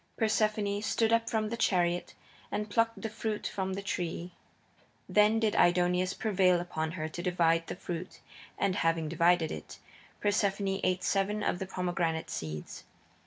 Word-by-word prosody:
Persephone 215 Hz, -2 st, +1 dB
stood 225 Hz, +1 st, +1 dB
up 230 Hz, 0 st, +2 dB
in 215 Hz, -1 st, 0 dB
the 235 Hz, -, -2 dB
chariot 175 Hz, -5 st, +1 dB, 0.4 s
and 210 Hz, 0 st, -3 dB
plucked 230 Hz, -2 st, +1 dB
the -, -, 0 dB
fruit 215 Hz, 0 st, -4 dB
from 190 Hz, -1 st, -2 dB
the 200 Hz, -, -5 dB
tree. 175 Hz, -2 st, -3 dB, 0.8 s
Then 210 Hz, +1 st, +4 dB
did 220 Hz, -2 st, +1 dB
Aidoneus 180 Hz, +1 st, +3 dB
prevail 190 Hz, -5 st, +3 dB
upon 160 Hz, -2 st, -3 dB
her 155 Hz, -3 st, -3 dB
to 175 Hz, -, -6 dB
divide 165 Hz, -2 st, +2 dB
the -, -, -4 dB
fruit, 180 Hz, 0 st, -6 dB, 0.4 s
and, 195 Hz, -1 st, +1 dB
having 165 Hz, -1 st, +1 dB
divided 170 Hz, 0 st, +3 dB
it, -, -, -7 dB, 0.4 s
Persephone 200 Hz, -1 st, +1 dB
ate 185 Hz, 0 st, +1 dB
seven 205 Hz, +2 st, 0 dB
of 175 Hz, -, 0 dB
the 190 Hz, -, -4 dB
pomegranate 175 Hz, -3 st, -2 dB
seeds. 75 Hz, -1 st, -6 dB
185 Hz, 155 wpm, -30 LUFS, 175-210 Hz, 0.8 s, Then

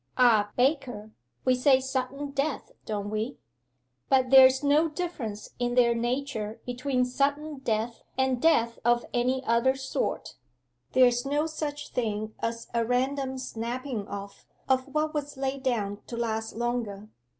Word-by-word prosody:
Ah, 225 Hz, -5 st, +5 dB
Baker, 250 Hz, -5 st, 0 dB, 0.3 s
we 255 Hz, -, +5 dB
say 260 Hz, +1 st, +4 dB
sudden 265 Hz, +2 st, -3 dB
death, 280 Hz, +1 st, -2 dB, 0.2 s
don't 205 Hz, -1 st, -3 dB
we? 215 Hz, +5 st, -2 dB, 0.7 s
But 260 Hz, -1 st, +3 dB
there's 265 Hz, +1 st, +8 dB
no 300 Hz, +3 st, +4 dB
difference 295 Hz, -, -5 dB
in 245 Hz, 0 st, 0 dB
their 240 Hz, -1 st, +5 dB
nature 235 Hz, -2 st, -2 dB
between 250 Hz, +1 st, 0 dB
sudden 285 Hz, +3 st, -1 dB
death 230 Hz, -2 st, -2 dB, 0.2 s
and 260 Hz, -2 st, +1 dB
death 235 Hz, -8 st, +3 dB
of 240 Hz, +1 st, +3 dB
any 255 Hz, +2 st, 0 dB
other 235 Hz, +3 st, +3 dB
sort. 265 Hz, 0 st, -3 dB, 0.6 s
There's 245 Hz, -1 st, +5 dB
no 290 Hz, +3 st, 0 dB
such 295 Hz, -2 st, -4 dB
thing 215 Hz, -2 st, -2 dB
as 230 Hz, 0 st, -3 dB
a 235 Hz, -1 st, +2 dB
random 260 Hz, +3 st, 0 dB
snapping 240 Hz, -2 st, -4 dB
off 200 Hz, 0 st, -8 dB, 0.2 s
of 260 Hz, 0 st, +2 dB
what 305 Hz, +2 st, -1 dB
was 290 Hz, -2 st, -4 dB
laid 270 Hz, 0 st, -2 dB
down 210 Hz, -6 st, -1 dB
to 235 Hz, -, -6 dB
last 225 Hz, -1 st, -2 dB
longer. 225 Hz, -3 st, -3 dB
255 Hz, 140 wpm, -28 LUFS, 230-275 Hz, 0.7 s, there's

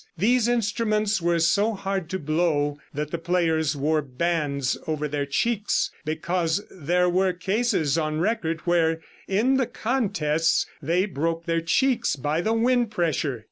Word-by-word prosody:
These 235 Hz, +6 st, +3 dB
instruments 215 Hz, -3 st, +1 dB
were 170 Hz, 0 st, +2 dB
so 200 Hz, +7 st, +2 dB
hard 195 Hz, -3 st, -3 dB
to 190 Hz, -, -2 dB
blow 155 Hz, -2 st, 0 dB
that 150 Hz, +1 st, -4 dB
the 170 Hz, -, -2 dB
players 165 Hz, -3 st, +1 dB
wore 150 Hz, +2 st, +1 dB
bands 140 Hz, -1 st, -1 dB
over 155 Hz, -1 st, -1 dB
their 145 Hz, -1 st, -2 dB
cheeks 210 Hz, +8 st, 0 dB
because 165 Hz, +3 st, -1 dB
there 180 Hz, +2 st, +1 dB
were 185 Hz, +1 st, +2 dB
cases 190 Hz, -, 0 dB
on 155 Hz, -1 st, -1 dB
record 170 Hz, -4 st, -1 dB
where, 165 Hz, -2 st, +2 dB, 0.3 s
in 235 Hz, +8 st, +2 dB
the 260 Hz, -3 st, +1 dB
contests, 165 Hz, -, 0 dB, 0.2 s
they 170 Hz, +6 st, +1 dB
broke 165 Hz, -2 st, -2 dB
their 165 Hz, -1 st, 0 dB
cheeks 255 Hz, +10 st, +1 dB
by 145 Hz, +4 st, -1 dB
the 220 Hz, -, 0 dB
wind 240 Hz, 0 st, +2 dB
pressure. 155 Hz, -, -1 dB
170 Hz, 145 wpm, -25 LUFS, 155-205 Hz, 0.3 s, These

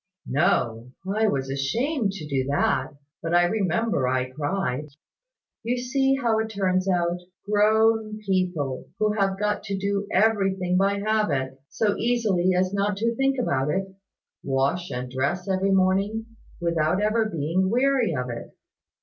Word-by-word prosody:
"No; 125 Hz, -4 st, 0 dB, 0.2 s
I 215 Hz, +3 st, +1 dB
was 135 Hz, -8 st, -1 dB
ashamed 220 Hz, -, 0 dB
to 165 Hz, -6 st, -7 dB
do 135 Hz, -2 st, -1 dB
that: 145 Hz, +1 st, 0 dB, 0.3 s
but 170 Hz, +1 st, -1 dB
I 175 Hz, -, +6 dB
remember 195 Hz, -, 0 dB
I 130 Hz, 0 st, 0 dB
cried. 145 Hz, -1 st, -2 dB, 0.7 s
You 245 Hz, +1 st, -1 dB
see 270 Hz, +2 st, +1 dB
how 235 Hz, -5 st, +1 dB
it 220 Hz, 0 st, -2 dB
turns 190 Hz, -2 st, 0 dB
out. 175 Hz, -1 st, +1 dB, 0.3 s
Grown 215 Hz, +1 st, +3 dB
people, 185 Hz, -10 st, -1 dB
who 215 Hz, 0 st, +1 dB
have 195 Hz, -2 st, 0 dB
got 210 Hz, 0 st, 0 dB
to 200 Hz, -2 st, -2 dB
do 200 Hz, +1 st, -1 dB
everything 195 Hz, -3 st, +2 dB
by 195 Hz, +2 st, +2 dB
habit, 150 Hz, -12 st, 0 dB
so 210 Hz, -2 st, 0 dB
easily 220 Hz, -7 st, +1 dB
as 185 Hz, +1 st, +1 dB
not 200 Hz, 0 st, 0 dB
to 230 Hz, +3 st, 0 dB
think 270 Hz, +2 st, +1 dB
about 140 Hz, -, 0 dB
it, 190 Hz, +3 st, -2 dB, 0.5 s
wash 140 Hz, +6 st, 0 dB
and 125 Hz, +1 st, -4 dB
dress 140 Hz, +9 st, -2 dB
every 190 Hz, 0 st, +1 dB
morning, 195 Hz, +3 st, +2 dB, 0.3 s
without 170 Hz, 0 st, +1 dB
ever 215 Hz, +2 st, +2 dB
being 175 Hz, 0 st, 0 dB
weary 250 Hz, -, +2 dB
of 125 Hz, -1 st, -3 dB
it. 120 Hz, -, -8 dB
190 Hz, 150 wpm, -25 LUFS, 155-215 Hz, 0.7 s, I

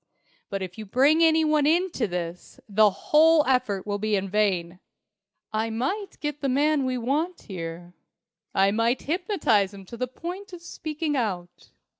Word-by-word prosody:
But 195 Hz, -1 st, -3 dB
if 185 Hz, +2 st, -8 dB
you 215 Hz, -, -7 dB
bring 280 Hz, +9 st, +4 dB
any 320 Hz, -1 st, +4 dB
one 305 Hz, -1 st, +3 dB
into 335 Hz, -, +1 dB
this, 175 Hz, -1 st, -6 dB
the 210 Hz, 0 st, +5 dB
whole 310 Hz, +9 st, +4 dB
effort 250 Hz, -7 st, 0 dB
will 205 Hz, -1 st, -2 dB
be 210 Hz, -1 st, +1 dB
vain. 190 Hz, -3 st, -1 dB, 0.7 s
I 220 Hz, +1 st, 0 dB
might 275 Hz, -, -3 dB
get 295 Hz, -1 st, -4 dB
the 275 Hz, -, 0 dB
man 285 Hz, +1 st, +2 dB
we 255 Hz, -1 st, -1 dB
want 295 Hz, +9 st, -1 dB
here. 175 Hz, -1 st, -7 dB, 0.6 s
I 195 Hz, +1 st, +3 dB
might 230 Hz, +4 st, +1 dB
hypnotize 300 Hz, -, +1 dB
him 195 Hz, -1 st, -11 dB
to 235 Hz, -, -10 dB
the 255 Hz, -, -2 dB
point 360 Hz, +9 st, -8 dB
of 345 Hz, -1 st, -9 dB
speaking 310 Hz, -2 st, -3 dB
out. 185 Hz, -8 st, -4 dB
245 Hz, 160 wpm, -25 LUFS, 200-310 Hz, 0.7 s, the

